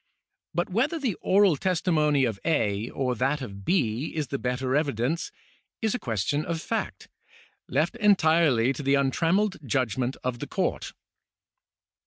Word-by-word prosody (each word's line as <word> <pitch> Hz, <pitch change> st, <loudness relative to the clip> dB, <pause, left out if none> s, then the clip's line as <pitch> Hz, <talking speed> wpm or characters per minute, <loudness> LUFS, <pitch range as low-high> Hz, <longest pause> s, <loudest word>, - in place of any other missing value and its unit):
But 175 Hz, +2 st, -1 dB
whether 265 Hz, -, +1 dB
the 265 Hz, -9 st, -1 dB
oral 195 Hz, -3 st, +4 dB
testimony 155 Hz, -6 st, +2 dB
of 110 Hz, -5 st, -3 dB
A. 110 Hz, -9 st, 0 dB
or 130 Hz, -2 st, -1 dB
that 135 Hz, +5 st, 0 dB
of 100 Hz, -7 st, -8 dB
B. 130 Hz, -, 0 dB
is 150 Hz, -5 st, -2 dB
the 140 Hz, -, -3 dB
better 130 Hz, +1 st, -1 dB
evidence, 145 Hz, +1 st, -1 dB, 0.5 s
is 220 Hz, 0 st, 0 dB
a 250 Hz, -, -2 dB
question 115 Hz, +6 st, -1 dB
of 165 Hz, 0 st, -3 dB
fact, 225 Hz, +6 st, -4 dB, 0.6 s
left -, -, 0 dB
entirely 160 Hz, -, +4 dB
to 135 Hz, -, -6 dB
the 140 Hz, 0 st, +2 dB
untrammelled 165 Hz, +9 st, +1 dB
judgment 130 Hz, 0 st, -1 dB
of 125 Hz, -2 st, -2 dB
the -, -, -5 dB
court. -, -, -2 dB
145 Hz, 145 wpm, -26 LUFS, 125-175 Hz, 0.6 s, oral